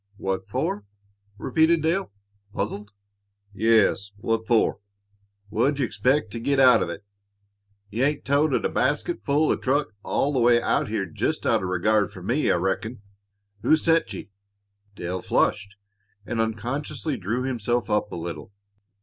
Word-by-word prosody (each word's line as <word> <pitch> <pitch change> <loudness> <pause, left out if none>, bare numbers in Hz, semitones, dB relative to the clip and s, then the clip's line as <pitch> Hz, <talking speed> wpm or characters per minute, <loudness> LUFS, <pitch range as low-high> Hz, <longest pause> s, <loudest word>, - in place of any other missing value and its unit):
"What 95 -1 -3
for?" 105 0 -2 0.5
repeated 160 +8 +2
Dale, 165 - 0 0.4
puzzled. 105 0 -3 0.6
"Yes; 110 -2 +3
what 115 +2 -1
for? 115 -2 +2 0.7
What 120 +7 +1
d' - - -9
you - - +3
expect 130 -1 +1
to 115 - -5
git 140 +4 +1
out 130 -2 +7
of - - -1
it? 100 +4 -7 0.9
You 120 +6 +1
ain't 145 0 -1
toted 145 +3 +2
a - - +2
basketful 155 - +1
o' - - +3
truck 140 -2 0
all 145 +6 0
the 130 - +1
way 120 0 +5
out - - +1
here 105 -2 -1
jest 85 - -2
out - - +3
of 90 - -3
regard 100 +2 +2
for 90 - -11
me, 125 +10 +1
I - - +4
reckon. 100 +5 -2 0.6
Who - - +5
sent 165 -6 +2
ye?" 100 0 -8 0.6
Dale 90 0 -4
flushed, 100 +1 0 0.5
and 115 0 -1
unconsciously 135 +7 -3
drew 115 +4 -2
himself 120 -2 -1
up 105 - 0
a - - -5
little. 85 +4 -6
115 Hz, 155 wpm, -25 LUFS, 100-140 Hz, 0.9 s, out